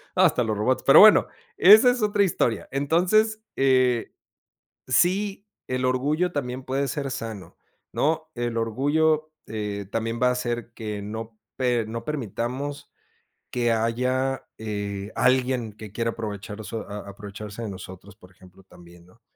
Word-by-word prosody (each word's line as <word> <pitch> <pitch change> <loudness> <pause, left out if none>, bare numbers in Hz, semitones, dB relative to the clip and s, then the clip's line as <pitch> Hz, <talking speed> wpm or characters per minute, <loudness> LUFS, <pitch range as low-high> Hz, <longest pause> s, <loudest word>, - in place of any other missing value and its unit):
Hasta 125 - +4
los 110 -2 -2
robots. 125 +5 0
Pero 135 - +8
bueno, 215 0 +8 0.3
esa 215 +6 +8
es 245 -2 -3
otra 210 -1 +2
historia. 120 - 0
Entonces, 180 +10 +2
eh, 130 -3 +2 0.7
sí, 195 +8 +1 0.2
el 125 0 -1
orgullo 150 +8 +1
también 130 -3 -4
puede 135 +2 -1
ser 140 +1 -3
sano, 110 -5 -7 0.4
¿no? 160 +1 0
El 120 -1 -2
orgullo 150 +7 +1 0.2
eh, 105 -2 -4
también 115 +1 -2
va 125 - +5
a - - +2
hacer 120 -2 -3
que 105 -2 -5
no 110 +2 -7 0.2
per 120 -4 0
no 115 +1 -5
permitamos 135 +1 -4 0.6
que 120 -1 +1
haya 125 +4 0
eh, 100 -2 -4
alguien 125 -3 +1
que 105 -1 -11
quiera 115 +2 -1
aprovechar, 105 -1 -6
so 110 +2 -6
a 100 -1 -7
a - - -7
aprovecharse 105 +2 -8
de 110 - -4
nosotros, 95 +1 -10
por 90 -3 -18
ejemplo, 90 +1 -19
también, 85 -2 -17
¿no? 115 +6 -24
120 Hz, 150 wpm, -25 LUFS, 105-140 Hz, 0.7 s, Pero